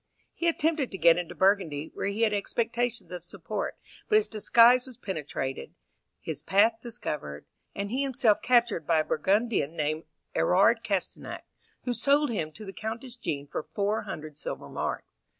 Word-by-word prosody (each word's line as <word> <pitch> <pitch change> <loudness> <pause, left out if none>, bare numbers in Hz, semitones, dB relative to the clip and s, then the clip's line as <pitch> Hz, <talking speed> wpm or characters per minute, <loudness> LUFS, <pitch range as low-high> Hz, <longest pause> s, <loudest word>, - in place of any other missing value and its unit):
He 340 - -1
attempted 320 -4 +1
to 190 - -6
get 170 -1 +6
into 175 - -6
Burgundy, 185 -7 +1
where - - -3
he 205 +3 0
had 215 -2 +3
expectations 235 +3 -1
of 180 -2 -6
support, 195 +3 -4 0.3
but 425 - +4
his 430 0 +4
disguise 235 +3 +5
was 255 -3 -11
penetrated, 150 -7 -4 0.4
his - - -5
path 220 +4 +3
discovered, 150 - -5 0.3
and 200 +1 -3
he 260 +3 0
himself 250 -6 +2
captured 240 -7 +2
by 160 -2 +4
a - - -5
Burgundian 195 -2 +1
named 155 +1 -1 0.3
Erard 200 +6 +4
Castenac, 200 -4 -3 0.4
who 245 - -1
sold 285 +2 +2
him 160 -8 -2
to 215 +7 -10
the 195 - -7
Countess 225 +4 -6
Jean 145 - -3
for 145 - -4
four 200 +7 -1
hundred 155 -7 -7
silver - - -5
marks. - - -3
205 Hz, 165 wpm, -28 LUFS, 170-240 Hz, 0.4 s, get